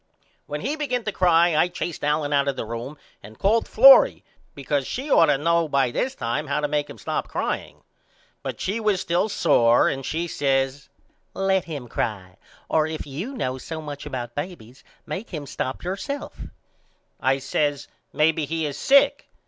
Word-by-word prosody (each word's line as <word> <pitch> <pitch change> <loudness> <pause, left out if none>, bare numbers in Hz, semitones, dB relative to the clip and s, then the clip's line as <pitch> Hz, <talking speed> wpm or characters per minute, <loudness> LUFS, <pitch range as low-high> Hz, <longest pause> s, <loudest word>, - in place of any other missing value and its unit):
When 150 0 -4
he 275 +8 -2
begin 255 -6 -2
to 215 - -2
cry 175 -3 +3
I 160 +3 +4
chased 175 -2 -5
Allen 150 0 0
out 140 0 +2
of 140 - 0
the - - -4
room 115 +6 -6 0.2
and 110 +2 -13
called 220 +4 +2
Florrie - - +7 0.3
because 140 -1 -2
she 270 +4 -4
should - - -3
ought 165 - +6
to 140 - +3
know 170 +2 +2
by 135 -4 +1
this 260 - -2
time 120 +7 -2
how - - 0
to 150 - 0
make 145 0 -1
him - - -10
stop - - -3
crying. - - -4 0.6
But - - -5
she 200 +5 -2
was 210 -4 +1
still 175 +6 0
sore 120 - +4
and 135 0 -4
she 165 +5 -2
says 135 -2 -1 0.5
Let 190 -1 +1
him 145 -7 -6
cry 95 -6 -4 0.3
or 155 -1 +2
if 160 0 -5
you 165 - -6
know 130 - -3
so 160 +4 -6
much 150 -1 -7
about 120 -4 -5
babys 145 -6 -7 0.2
make 200 +5 -6
him 155 -5 -6
stop 130 -1 -4
yourself 195 +11 -5 0.8
I 135 +1 +2
says 145 +1 -1 0.2
Maybe 155 +1 +2
he 160 +1 -2
is 145 -2 -4
sick. 275 +1 +3
150 Hz, 180 wpm, -24 LUFS, 135-180 Hz, 0.8 s, Florrie